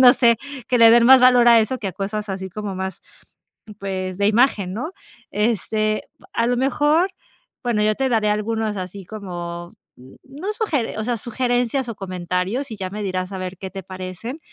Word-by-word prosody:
no 250 -1 +9
sé, 235 -4 +4 0.3
que 250 -2 +2
le 230 -1 +8
den 235 0 +6
más 265 -1 +9
valor 250 -1 +6
a 235 -1 +8
eso 250 +4 -1
que 200 - -3
a 185 - -6
cosas 205 +2 -4
así 190 0 -4
como 205 0 -5
más, 190 0 -4 0.8
pues, 185 -1 -4
de 200 0 +2
imagen, 210 -5 +2
¿no? 305 - -4 0.4
Este, 215 0 0 0.2
pa - - -19
a 230 +1 +1
lo 245 - +1
mejor, 295 +7 +2 0.5
bueno, 235 -4 +1
yo 215 0 +2
te 265 -1 0
daré 220 -3 +2
algunos 215 0 -1
así 185 +1 -6
como, 175 -3 -7 0.2
mm, 130 +2 -15
no 290 +7 -8
sugeren 300 - -1
o - - -1
sea, 240 -2 0
sugerencias 245 +2 -1
o 225 - -5
comentarios, 185 +6 -3
y 215 - -6
ya 185 -1 -4
me 210 +1 -5
dirás 185 0 -2
a - - -4
ver 185 0 -5
qué 190 +1 -6
te 190 -1 -8
parecen, 185 - -7
215 Hz, 200 wpm, -21 LUFS, 190-245 Hz, 0.8 s, no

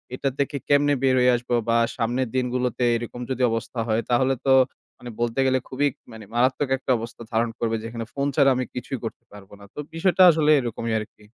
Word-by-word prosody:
এটা 135 +1 -1
থেকে 140 0 -1
কেমনে 145 0 +4
বের 130 -1 +4
হয়ে 125 0 +4
আসব। 120 0 -6 0.2
বা 115 - +3 0.2
সামনের 125 +1 -1
দিনগুলোতে 125 -1 -1
এরকম 120 +1 -5
যদি 130 -1 -2
অবস্থা 115 +1 -4
হয়, 110 +1 +1
তাহলে 130 +2 +2
তো, 135 - +5 0.4
মানে, 125 - -9
বলতে 120 +2 -1
গেলে 130 0 +2
খুবই, 145 +2 0 0.2
মানে, 110 -1 -10
মারাত্মক 130 +3 +1
একটা 130 0 -3
অবস্থা 115 +1 -8
ধারণ 115 +1 +1
করবে, 115 -1 0
যেখানে 115 0 -5
phone 140 0 -1
ছাড়া 140 -2 +5
আমি 130 - -1
কিছুই 125 +1 -4
করতে 115 - -6
পারব 100 -1 -14
না। - - -14
তো - - -9
বিষয়টা 185 +2 +3
আসলে 155 -1 +2
এরকমই 115 -2 -3
আরকি। 105 0 -11
125 Hz, 200 wpm, -24 LUFS, 115-135 Hz, 0.4 s, তো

